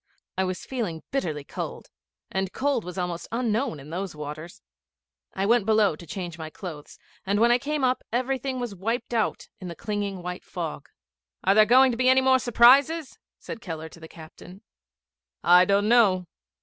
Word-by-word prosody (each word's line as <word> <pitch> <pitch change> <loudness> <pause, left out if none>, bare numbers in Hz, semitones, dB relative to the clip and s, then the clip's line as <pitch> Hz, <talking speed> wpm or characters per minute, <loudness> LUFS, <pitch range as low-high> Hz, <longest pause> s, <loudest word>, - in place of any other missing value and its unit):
I 190 - 0
was 185 0 -4
feeling 210 -12 -4
bitterly 160 - -2
cold, - - -7 0.4
and 190 0 -2
cold 280 -3 0
was 180 +1 -8
almost 175 -2 -3
unknown 230 - -1
in 145 +3 -12
those 185 0 -4
waters. 150 - -8 0.7
I 195 - 0
went 230 -1 +3
below 215 -6 +3
to 170 +2 -13
change 175 0 -6
my 160 -1 -6
clothes, 155 -3 -9 0.3
and 200 +2 0
when 235 +1 +5
I 240 - +4
came 295 +1 -2
up 255 0 +1
everything 255 +2 -1
was 240 -4 -4
wiped 225 +6 -3
out 225 -2 -1
in 180 -2 -7
clinging 200 -3 -4
white 180 0 -5
fog. 165 -5 -6 0.5
'Are 195 - +4
there 215 +1 +6
going 260 +3 +6
to 230 - -4
be 255 0 +4
any 260 0 +5
more 260 0 +4
surprises?' 270 +6 +4 0.2
said 230 - -8
Keller 160 -5 -6
to 165 - -15
the 160 - -10
captain. 175 +5 -13 0.8
'I 180 +1 +7
don't 200 +1 +2
know. 205 -6 +4
200 Hz, 175 wpm, -25 LUFS, 175-245 Hz, 0.8 s, I